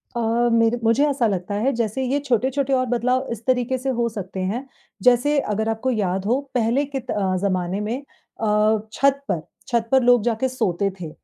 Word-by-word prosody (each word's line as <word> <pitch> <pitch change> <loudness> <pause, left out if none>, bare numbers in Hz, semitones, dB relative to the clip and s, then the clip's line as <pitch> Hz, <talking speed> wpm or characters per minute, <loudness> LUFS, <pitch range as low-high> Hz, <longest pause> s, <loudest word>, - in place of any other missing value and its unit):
अ, 235 +1 +1
मेरे 230 +1 +3
मुझे 230 +6 +3
ऐसा 270 -5 +1
लगता 195 0 -2
है 245 +7 +1
जैसे 230 +3 -1
ये 275 +3 0
छोटे-छोटे 270 +1 0
और 255 -1 +2
बदलाव 250 +2 +1
इस 230 0 -6
तरीके 255 0 +1
से 265 +2 -3
हो 235 - +2
सकते 195 -3 -6
हैं, 220 +9 -3 0.4
जैसे 250 +4 +4
अगर 220 -2 -1
आपको 225 +4 -1
याद 195 -4 -1
हो, 245 +5 +2 0.2
पहले 245 +4 +2
कित 270 -3 -5
अ, 190 -2 0
ज़माने 185 -1 -1
में 225 +5 -2 0.4
अ, 215 0 +3
छत 275 0 +2
पर 175 -5 -1 0.3
छत 235 -3 0
पर 265 -1 +5
लोग 245 -3 +5
जाके 235 +2 0
सोते 200 -6 0
थे, 165 -3 -6
235 Hz, 190 wpm, -22 LUFS, 210-260 Hz, 0.4 s, पर